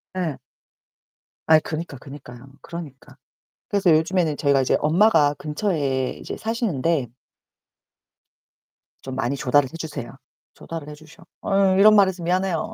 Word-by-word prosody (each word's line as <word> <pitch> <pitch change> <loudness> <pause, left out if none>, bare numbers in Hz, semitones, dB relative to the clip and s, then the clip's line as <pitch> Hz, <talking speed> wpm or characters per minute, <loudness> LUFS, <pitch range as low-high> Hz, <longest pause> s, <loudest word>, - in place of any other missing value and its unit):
예. 165 -7 -2 1.1
아이 160 -1 +6
그니까, 155 -2 -6
그니까요. 130 -2 -12
그러니까. 145 -5 -10 0.5
그래서 195 -4 +2
요즘에는 160 0 +2
저희가 140 -3 +2
이제 - - +2
엄마가 160 -3 +3
근처에 150 -5 -2
이제 - - -6
사시는데 170 - -1 1.9
좀 130 -1 -7
많이 135 +1 -1
조달을 135 0 +2
해 - - -8
주세요. 150 -7 -6 0.4
조달을 165 -3 -8
해 - - -8
주셔. 155 +2 -17 0.2
어 195 -1 +2
이런 215 +2 +7
말해서 190 -3 +3
미안해요. 185 +4 -1
160 Hz, 300 characters per minute, -22 LUFS, 140-185 Hz, 1.9 s, 이런